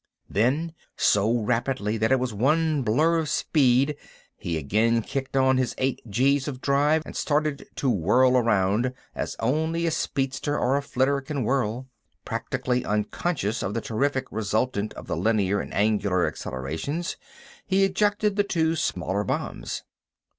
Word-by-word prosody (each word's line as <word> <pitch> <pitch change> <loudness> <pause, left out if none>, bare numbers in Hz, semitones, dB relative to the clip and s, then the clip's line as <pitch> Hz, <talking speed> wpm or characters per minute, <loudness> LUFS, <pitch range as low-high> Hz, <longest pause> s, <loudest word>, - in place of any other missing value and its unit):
Then, 140 - +1 0.2
so 105 +2 +3
rapidly 115 -1 -1
that 110 +3 +1
it 135 - +4
was 125 -3 -2
one 150 +7 +2
blur 155 +9 +2
of 155 -3 -2
speed, 135 0 +2 0.4
he 85 -2 -3
again 110 +10 +1
kicked 135 +2 -3
on 130 0 +4
his 130 -3 0
eight 130 -1 -1
G's 135 +6 +2
of 130 -3 -4
drive 145 +3 +2
and - - -9
started 150 -1 -1
to 140 - -2
whirl 125 +5 +3
around 115 +1 +2 0.2
as - - -4
only 160 +7 0
a 165 - +1
speedster 135 0 -1
or 130 +2 +2
a 140 - +1
flitter 140 0 0
can 135 -1 -3
whirl. 125 0 -1 0.4
Practically 125 -1 -2
unconscious 105 - -1
from 100 - -3
the 115 - -1
terrific 130 +4 -1
resultant 110 0 -1
of - - -9
the - - -2
linear 100 -3 +1
and - - -6
angular 100 -3 +1
accelerations, 80 - -4 0.5
he 195 0 +3
ejected 205 +1 +1
the 205 - +4
two 165 -4 +1
smaller 95 - -1
bombs. - - -3
130 Hz, 150 wpm, -25 LUFS, 110-145 Hz, 0.5 s, it